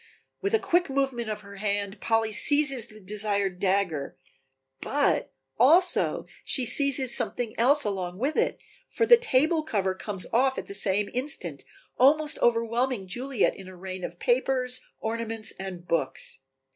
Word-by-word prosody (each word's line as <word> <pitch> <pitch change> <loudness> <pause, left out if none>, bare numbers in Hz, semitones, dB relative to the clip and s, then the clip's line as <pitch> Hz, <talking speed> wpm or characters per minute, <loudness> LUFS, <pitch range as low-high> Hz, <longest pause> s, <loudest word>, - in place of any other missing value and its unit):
With 400 +3 +1
a - - +2
quick 350 -4 +1
movement 270 -4 -1
of 210 -1 -4
her 200 -1 -12
hand 200 0 -3
Polly 225 -1 +1
seizes 275 0 +4
the 215 -2 -15
desired 200 -2 -2
dagger, 185 -7 -1 0.6
but 285 +1 0 0.3
also 345 +8 +4 0.2
she 255 - 0
seizes 265 -2 +3
something 240 -2 0
else 280 +5 +4
along 185 -3 -3
with 275 +8 -1
it, - - 0 0.3
for 455 - 0
the 475 - +9
table 320 - +2
cover 200 -11 -1
comes 190 0 -4
off 260 +3 +2
at - - -4
the - - -9
same 200 0 +1
instant, 245 - -3 0.4
almost 300 +4 +3
overwhelming 230 -2 0
Juliet 245 +4 0
in 195 - -11
a 185 - -11
rain 185 0 -7
of 175 - -6
papers, 255 +2 0 0.2
ornaments 225 0 -3
and 185 -2 -7
books. 135 -4 -2
230 Hz, 150 wpm, -26 LUFS, 195-270 Hz, 0.6 s, the